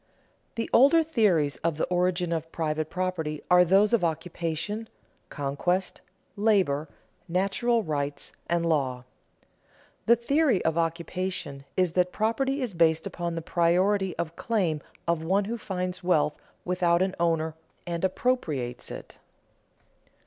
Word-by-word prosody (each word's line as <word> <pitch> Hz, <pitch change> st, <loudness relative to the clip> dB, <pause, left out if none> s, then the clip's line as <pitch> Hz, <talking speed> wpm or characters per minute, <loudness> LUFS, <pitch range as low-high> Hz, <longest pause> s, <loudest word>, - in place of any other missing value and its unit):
The 230 Hz, -, -2 dB
older 285 Hz, +7 st, +6 dB
theories 200 Hz, -, +2 dB
of 165 Hz, -2 st, -1 dB
the -, -, -1 dB
origin 180 Hz, -1 st, 0 dB
of 165 Hz, -1 st, -3 dB
private 155 Hz, -1 st, -2 dB
property 175 Hz, -5 st, -3 dB
are 180 Hz, 0 st, +8 dB
those 195 Hz, +5 st, +4 dB
of 225 Hz, -6 st, +3 dB
occupation, 165 Hz, +5 st, -3 dB, 0.4 s
conquest, 145 Hz, +7 st, -2 dB, 0.3 s
labor, 190 Hz, -9 st, +2 dB, 0.4 s
natural 200 Hz, +6 st, +1 dB
rights, 145 Hz, -3 st, -3 dB, 0.2 s
and 170 Hz, 0 st, +1 dB
law. 130 Hz, -6 st, 0 dB, 1.0 s
The 235 Hz, -, +7 dB
theory 260 Hz, -, +1 dB
of 160 Hz, -, +2 dB
occupation 170 Hz, -3 st, -3 dB
is 185 Hz, -2 st, +2 dB
that 180 Hz, +1 st, +1 dB
property 265 Hz, +7 st, 0 dB
is 235 Hz, -6 st, -3 dB
based 165 Hz, -1 st, +3 dB
upon 170 Hz, -1 st, -3 dB
the 165 Hz, -, -4 dB
priority 185 Hz, +3 st, +2 dB
of 170 Hz, -1 st, -3 dB
claim 175 Hz, -10 st, 0 dB, 0.3 s
of 170 Hz, -1 st, 0 dB
one 195 Hz, +4 st, +1 dB
who 230 Hz, +3 st, -3 dB
finds 185 Hz, -4 st, -4 dB
wealth 155 Hz, -4 st, +2 dB, 0.3 s
without 180 Hz, -1 st, +2 dB
an 190 Hz, 0 st, -1 dB
owner 165 Hz, -2 st, +1 dB, 0.3 s
and 170 Hz, 0 st, -4 dB
appropriates 160 Hz, -, -1 dB
it. -, -, -9 dB
175 Hz, 130 wpm, -27 LUFS, 160-200 Hz, 1.0 s, are